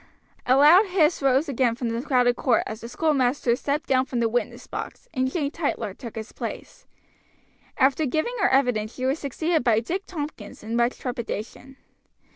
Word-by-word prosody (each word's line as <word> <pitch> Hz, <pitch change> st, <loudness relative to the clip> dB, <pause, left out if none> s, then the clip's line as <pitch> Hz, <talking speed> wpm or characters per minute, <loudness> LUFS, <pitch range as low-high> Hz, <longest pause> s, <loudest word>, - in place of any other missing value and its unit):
A 255 Hz, -, +5 dB
loud 335 Hz, +9 st, +7 dB
hiss 350 Hz, -4 st, +2 dB
rose 275 Hz, +3 st, +3 dB
again 255 Hz, -4 st, +1 dB
from 240 Hz, -2 st, -3 dB
the 230 Hz, +1 st, -2 dB
crowded 245 Hz, -2 st, +2 dB
court 250 Hz, -3 st, +2 dB
as 220 Hz, +1 st, -7 dB
the 235 Hz, -, -7 dB
schoolmaster 260 Hz, -4 st, +1 dB
stepped 285 Hz, +4 st, -2 dB
down 260 Hz, 0 st, +2 dB
from 245 Hz, -, -2 dB
the 230 Hz, -, +2 dB
witness 245 Hz, +2 st, -2 dB
box, -, -, -7 dB
and 260 Hz, -2 st, 0 dB
Jane 290 Hz, -4 st, -1 dB
Tytler 285 Hz, -, -3 dB
took 235 Hz, -4 st, -9 dB
his 220 Hz, 0 st, -7 dB
place. -, -, -8 dB, 0.9 s
After 275 Hz, +3 st, +3 dB
giving 315 Hz, -, -1 dB
her 395 Hz, -, +3 dB
evidence 245 Hz, -5 st, +1 dB
she 255 Hz, -, -3 dB
was 270 Hz, +4 st, 0 dB
succeeded 315 Hz, +3 st, -1 dB
by 230 Hz, -3 st, +3 dB
Dick 360 Hz, -, -4 dB
Tompkins 290 Hz, -, -7 dB
in 225 Hz, +2 st, -4 dB
much 235 Hz, +1 st, +1 dB
trepidation. 245 Hz, +1 st, -6 dB
260 Hz, 180 wpm, -24 LUFS, 235-295 Hz, 0.9 s, loud